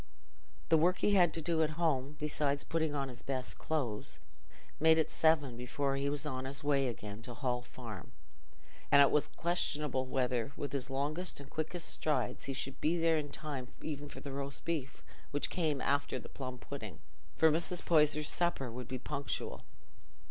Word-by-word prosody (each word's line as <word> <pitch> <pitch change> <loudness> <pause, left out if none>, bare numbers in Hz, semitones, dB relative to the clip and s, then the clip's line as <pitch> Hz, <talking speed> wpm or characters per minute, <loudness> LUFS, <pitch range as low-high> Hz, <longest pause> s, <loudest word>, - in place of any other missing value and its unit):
The 160 -1 +6
work 180 +3 +4
he 205 - +3
had 180 -4 +6
to 165 - -3
do 165 -1 +2
at 155 0 0
home, 150 -4 +1
besides 145 -1 0
putting 160 -2 0
on 140 -1 0
his 125 -2 -8
best 130 -2 -3
clothes, 130 -10 -2 0.6
made 160 +1 +6
it 160 - +1
seven 155 -6 +3
before 135 +3 -1
he 140 +1 0
was 145 -1 -1
on 130 0 -3
his 140 +3 +1
way 140 -2 +3
again 105 -2 -5
to 115 - -8
the - - -5
Hall 125 -2 -1
Farm, 120 - -9 0.8
and 140 - +8
it 140 - +7
was 150 - +3
questionable 150 -6 0
whether, 125 -1 0
with 145 - -3
his 135 -2 -2
longest 150 +7 -1
and 140 0 -11
quickest 160 +2 -2
strides, 155 -1 0
he 135 - -1
should 135 0 -3
be 165 +3 +2
there 165 -1 +3
in 145 -1 -4
time 140 -5 -5 0.2
even 145 -2 -4
for - - -9
the 140 - -6
roast 140 0 -4
beef, 150 -5 -3 0.3
which 145 - 0
came 155 -6 +1
after 140 0 +1
the - - -9
plum 130 -2 -6
pudding, - - -7 0.4
for 160 -1 +6
Mrs. 170 +3 +1
Poyser's 150 -2 +4
supper 170 -8 +1
would 125 0 -6
be 130 - -3
punctual. 140 +2 -4
145 Hz, 185 wpm, -34 LUFS, 130-160 Hz, 0.8 s, and